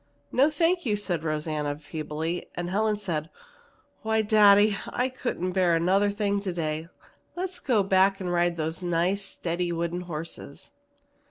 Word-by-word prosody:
"No, 275 +4 +4
thank 340 +3 +1
you," 220 -6 +1
said 180 -6 -1
Rosanna 150 -2 -2
feebly, 155 +2 -4
and 175 0 -3
Helen 215 +2 +1
said, 165 -6 -3 0.7
"Why, 220 0 +1
daddy, 205 -1 +6
I 250 +1 -1
couldn't 240 -8 -3
bear 180 -2 +3
another 190 +5 +3
thing 200 0 0
today! 165 -4 -3 0.5
Let's 360 0 -4
go 230 -7 +2
back 195 0 +3
and 180 -2 -2
ride 175 0 +1
those 160 +1 -3
nice 175 +3 0
steady 175 -2 -3
wooden 170 +1 -2
horses." 165 -4 -8
180 Hz, 145 wpm, -27 LUFS, 165-205 Hz, 0.7 s, daddy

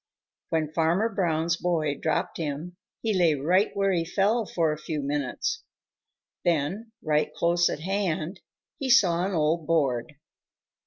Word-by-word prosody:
When 155 -1 -1
Farmer 170 +7 +2
Brown's 170 -4 0
boy 160 -5 0
dropped 155 +1 -1
him, 160 +3 -4 0.3
he 220 -1 +1
lay 175 -5 +3
right 180 +9 +2
where 195 0 +2
he 170 -3 +1
fell 200 +6 +1
for 165 -3 +1
a 150 - -3
few 155 0 -4
minutes. 140 -2 -2 0.8
Then, 175 +7 0
right 150 -1 +1
close 175 +1 +2
at 150 - -4
hand, 185 -1 -2 0.4
he 270 -3 -2
saw 180 -9 +5
an 190 0 -1
old 155 0 +1
board. 145 -4 0
170 Hz, 145 wpm, -26 LUFS, 155-190 Hz, 0.8 s, saw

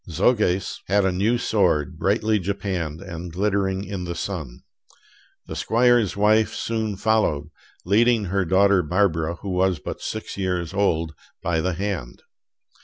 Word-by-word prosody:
Soges 95 +1 +1
had 100 +1 +3
a 95 - +2
new 105 +7 +1
sword, 85 -9 +1
brightly 110 +2 +1
japanned 95 -5 -3
and 90 -2 -7
glittering 95 +1 0
in 100 -3 -5
the 85 0 -4
sun. 80 -10 -5 0.8
The - - -7
squire's 120 -3 +2
wife 110 +1 +3
soon 110 -2 -2
followed, 95 -9 +1 0.3
leading 115 +4 +3
her 100 +1 0
daughter 95 +2 +4
Barbara, 85 -1 0
who 95 +3 -6
was 90 -1 +2
but 75 - -7
six 110 -2 -5
years 90 -3 -2
old, 85 -5 0 0.3
by 80 -2 0
the 90 +2 -1
hand. 90 -9 -4
95 Hz, 140 wpm, -23 LUFS, 85-105 Hz, 0.8 s, daughter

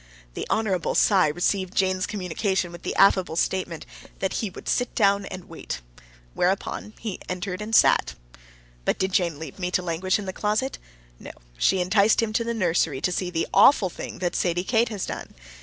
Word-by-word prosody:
The - - -5
Hon. 200 -5 0
Cy 190 -6 +4
received 180 +4 -1
Jane's 185 -1 +1
communication 190 -2 -2
with 175 0 -10
the - - -4
affable 185 -4 +4
statement 175 -1 -1 0.3
that 190 - -2
he 215 - -2
would 185 - -12
sit 245 -1 0
down 200 -2 +3
and 185 - -8
wait. - - -6 0.5
Whereupon 195 +3 -1
he 215 -5 -5
entered 185 +1 -4
and 220 +1 -1
sat. - - +4 0.7
But - - 0
did 190 0 -1
Jane 170 -5 +1
leave 160 0 -9
me 180 -1 -1
to 180 0 0
languish 180 +2 0
in 205 - -6
the 190 - -4
closet? 215 +8 -1 0.4
No; - - -9 0.3
she - - +2
enticed 200 +4 +3
him 225 -2 0
to 230 - +1
the 235 0 -2
nursery 165 -8 +1
to 180 - 0
see 180 0 -2
the 165 -2 -1
AWFUL 205 -10 +6
thing - - -7
that 175 -1 -2
Sadie 175 0 0
Kate 230 +3 +2
has 205 -4 -3
done. - - -7
185 Hz, 190 wpm, -25 LUFS, 175-210 Hz, 0.7 s, AWFUL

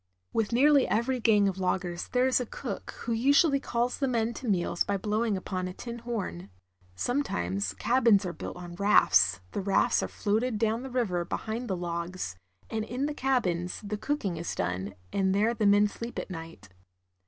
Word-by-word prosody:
With 225 -1 0
nearly 280 +3 +5
e\'ery 240 +4 0
gang 210 -3 +4
of 190 -1 -2
loggers 180 -1 -1
there 250 0 +2
is 260 0 +3
a 250 - -3
cook, - - -6
who 235 - -3
usually 280 +5 +4
calls 240 -2 -1
the 275 - +1
men 235 -2 0
to 255 - -7
meals 175 -3 +1
by 200 - -1
blowing 215 +1 0
upon 185 -1 -3
a 180 - -6
tin 235 +1 -7
horn. 200 - -4 0.5
Sometimes 100 - -1
cabins 230 - +3
are 175 - -3
built - - -7
on 175 -1 -8
rafts, 100 - +4
the - - -2
rafts 195 0 +2
are - - -2
floated 220 +3 0
down 225 +2 +1
the 265 - -6
river 215 -9 0
behind 220 +7 -4
the 190 -4 -1
logs, 170 - -4 0.3
and 220 -1 -2
in 250 +5 -2
the 300 - -2
cabins 185 -11 0
the 210 +1 -3
cook 290 +5 -2
ing 180 -3 -1
is 170 - -4
done, 90 +2 -2 0.2
and 190 -1 +2
there 215 +4 +3
the 220 -3 +1
men 205 +1 +5
sleep 230 +3 -7
at - - -4
night. 165 - -9
210 Hz, 190 wpm, -29 LUFS, 180-240 Hz, 0.5 s, nearly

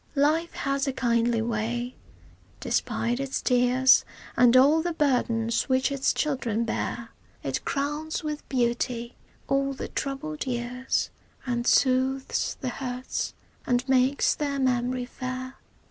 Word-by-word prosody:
Life 310 +4 +2
has 275 +1 -1
a 270 - 0
kindly 235 -2 +1
way, 235 +2 -2 0.7
despite 240 +2 -1
its 275 -1 -2
tears 250 +1 +4 0.3
And 245 0 +6
all 290 +5 +6
the 345 +1 -2
burdens 235 -6 +1
which 260 +2 +2
its 275 -1 +1
children 245 -7 -1
bear; 230 0 -3 0.3
It - - -2
crowns 295 +4 -2
with 300 -1 -5
beauty 240 -1 -1 0.3
all 275 0 +1
the - - -6
troubled 280 +2 -4
years 250 +1 -1 0.3
And 240 -1 -1
soothes 265 +1 +2
the 255 - -1
hurts 250 0 -4 0.3
and 245 +1 +1
makes 260 +1 +3
their 285 -2 -2
memory 250 -1 0
fair. 255 +1 -6
255 Hz, 125 wpm, -26 LUFS, 240-275 Hz, 0.7 s, And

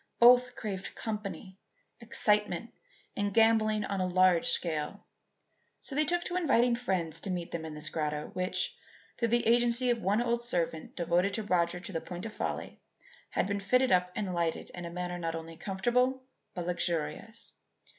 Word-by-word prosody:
Both 245 +1 +6
craved 195 -3 -5
company, 200 -3 -5 0.4
excitement, 210 -3 0 0.4
and 205 0 0
gambling 220 -1 +4
on 195 -2 -2
a 185 - +1
large 180 -1 +4
scale; 160 +3 0 0.7
so - - -4
they 305 +3 +2
took 345 +3 0
to 355 - -4
inviting 250 -8 +3
friends 175 -9 -1
to - - -4
meet 175 -2 -3
them 165 -1 -4
in 155 -1 -6
this 150 +1 -4
grotto 150 -1 -2
which, 185 - -1 0.4
through 235 - +2
the 240 +1 +2
agency 240 +1 +4
of 235 -1 -1
one 205 +3 +2
old 235 0 +1
servant 170 -8 -2
devoted 175 +3 +1
to 220 - -2
Roger 180 -3 +1
to 200 +4 -7
the 165 -3 -2
point 175 +1 -7
of 225 - -6
folly, - - -4 0.5
had - - 0
been 200 +1 -1
fitted 255 +6 +2
up 180 0 +3
and 195 -3 -2
lighted 170 -2 -1
in 175 -1 -6
a - - -5
manner 180 0 -4
not 165 -1 -2
only 165 0 -7
comfortable 245 +9 0 0.3
but 175 -2 -3
luxurious. 175 +6 -2
195 Hz, 175 wpm, -30 LUFS, 175-235 Hz, 0.7 s, Both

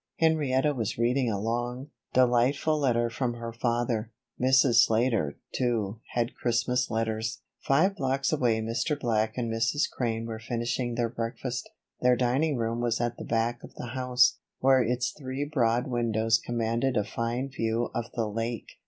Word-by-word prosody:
Henrietta 150 -3 +2
was 115 -5 -3
reading 120 +2 +2
a 105 - -1
long, 120 +5 -3 0.2
delightful 130 +5 +3
letter 120 -4 +2
from 120 +1 -2
her 115 -1 -6
father. 120 -1 -1 0.3
Mrs. 130 -1 +5
Slater, 115 - +1 0.2
too, 115 -4 -1 0.2
had 120 +1 0
Christmas 125 +1 0
letters. 110 0 -2 0.2
Five 185 +9 +2
blocks 135 0 0
away 120 -6 +2
Mr. 115 +7 -1
Black 110 -2 0
and 115 -2 -1
Mrs. 115 +6 +1
Crane 115 -2 -2
were 110 -1 -5
finishing 120 +1 -2
their 120 0 +1
breakfast. 120 +2 -4 0.3
Their 125 0 +5
dining 130 +4 +1
room 115 0 -1
was 120 -1 0
at 120 0 -1
the - - -6
back 115 +1 -1
of - - -12
the 120 - -6
house, 125 -1 +3 0.2
where 130 0 +4
its 125 +1 0
three 135 0 -4
broad 125 -4 +1
windows 115 -2 +1
commanded 120 +2 -1
a 105 - +2
fine 120 +5 -3
view 115 -2 -1
of 120 - -2
the 115 - 0
lake. 115 +2 -4
120 Hz, 160 wpm, -28 LUFS, 115-130 Hz, 0.3 s, Mrs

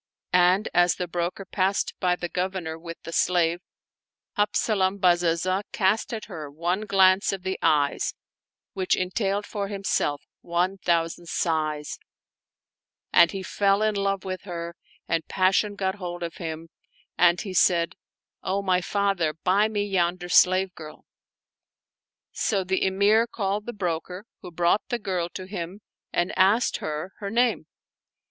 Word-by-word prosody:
And 180 +3 +4
as 175 0 +4
the 180 - -3
broker 175 +3 -3
passed 195 +1 0
by 180 -2 +2
the 175 - -4
Governor 180 -2 -3
with 165 0 -8
the 165 - -7
slave, 175 -1 +2 0.8
Habzalam 205 -2 +1
Bazazah 180 0 +2
cast 200 +4 +1
at 225 -2 -5
her 160 -7 -7
one 175 +8 -2
glance 190 -1 +4
of 195 -2 -5
the 190 0 -3
eyes 145 -2 +1 0.6
which 190 -1 +1
entailed 195 +2 -1
for 200 -1 -4
himself 195 -7 -1 0.2
one 180 +3 -1
thousand 170 -1 0
sighs; 155 -3 -1 1.1
and 170 -1 +7
he 195 +1 -5
fell 200 +2 +2
in 215 0 +2
love 195 -1 -1
with 185 -1 -4
her 170 -2 -6 0.3
and 165 -1 -1
pas 185 0 +2
sion 210 -1 0
got 190 -1 -1
hold 175 -3 -6
of 170 -1 -5
him 165 -1 -6 0.5
and 175 0 +4
he 195 - -6
said, 170 -2 +3 0.3
" - - -67
O 195 +1 -1
my 185 -1 +2
father, 195 -5 0
buy 200 +3 +3
me 205 -2 -1
yonder 175 -2 -1
slave 185 +1 +4
girl." 155 -3 -11 1.3
So 200 -3 0
the 190 +1 0
Emir 205 +4 +3
called 205 -1 -2
the - - -2
broker, 180 -1 -4 0.2
who 180 - -8
brought 175 +4 +2
the 240 - 0
girl 185 -6 -2
to 185 - -5
him 190 +1 -6 0.3
and 175 +1 0
asked 205 +6 +3
her 155 +5 -5
her 200 - -4
name. 240 +2 +1
185 Hz, 150 wpm, -25 LUFS, 170-200 Hz, 1.3 s, and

